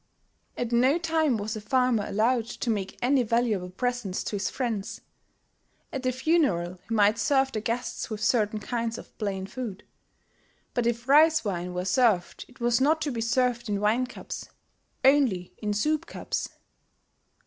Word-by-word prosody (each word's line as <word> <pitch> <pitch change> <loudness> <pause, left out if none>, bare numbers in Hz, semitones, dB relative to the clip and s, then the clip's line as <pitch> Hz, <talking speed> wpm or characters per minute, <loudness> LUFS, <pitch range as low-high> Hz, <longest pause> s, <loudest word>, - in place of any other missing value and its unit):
At 245 -1 -2
no 255 +6 +4
time 320 -6 +1
was 215 +1 -3
a 215 - -5
farmer 250 -1 +2
allowed 230 +3 +1
to 240 0 -2
make 195 -3 -3
any 265 +1 +4
valuable 225 -5 0
presents 240 -1 -2
to - - -3
his 195 -1 -1
friends. 225 -6 -3 0.9
At 265 -2 -2
a - - +3
funeral 245 - +1
he 225 - 0
might 210 +1 +4
serve 270 +1 +2
the 215 - -3
guests 235 +4 -3
with 215 -2 -4
certain 215 -3 +2
kinds 230 0 -3
of - - -12
plain 195 -3 -2
food; 210 -1 -6 0.9
but 240 -1 +1
if 235 +1 -2
rice 310 +1 +5
wine 180 -2 -3
were 180 0 -2
served 205 -4 +2
it 255 +1 -20
was 240 +1 +2
not 310 +4 +3
to 290 - -1
be 230 -2 -3
served 240 0 +1
in 205 -1 0
wine 225 +5 +2
cups, - - -8 0.6
only 260 -11 +3
in 210 -1 -2
soup 300 +10 0
cups! - - -4
235 Hz, 165 wpm, -27 LUFS, 210-255 Hz, 0.9 s, rice